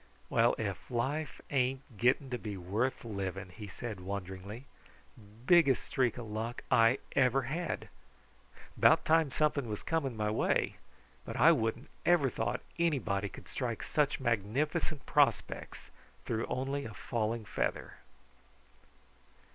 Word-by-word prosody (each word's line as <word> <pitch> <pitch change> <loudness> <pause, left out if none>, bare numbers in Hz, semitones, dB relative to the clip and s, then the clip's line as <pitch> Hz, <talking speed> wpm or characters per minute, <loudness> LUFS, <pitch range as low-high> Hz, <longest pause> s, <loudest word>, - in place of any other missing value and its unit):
"Well, 115 +1 +4
if 100 -4 -4
life 135 +5 -2
ain't 130 -2 0
getting 130 +3 +2
to 125 - -2
be 105 -3 -5
worth 105 +9 -1
living!" 95 -3 -4
he 105 +3 -9
said 105 +1 -6
wonderingly. 100 +5 -6 0.8
"Biggest 160 -5 +5
streak 125 -4 0
of 120 - -5
luck 110 +3 -4
I 115 +2 +6 0.2
ever 130 0 +4
had! 160 +7 -3 0.9
'Bout - - +5
time 160 -2 +4
something 140 -2 +1
was 105 - -4
coming 140 -8 -1
my 105 0 0
way, 110 - +1 0.5
but - - -6
I - - +7
wouldn't 110 0 -1
ever 155 -7 +4
thought - - -2 0.2
anybody 115 -12 +1
could - - -12
strike 120 -4 -3
such 150 -2 +1
magnificent 135 - -1
prospects - - +1 0.3
through 115 -1 -1
only 135 +2 -2
a 110 - -8
falling 115 -1 -2
feather." - - -2
120 Hz, 130 wpm, -32 LUFS, 105-135 Hz, 0.9 s, I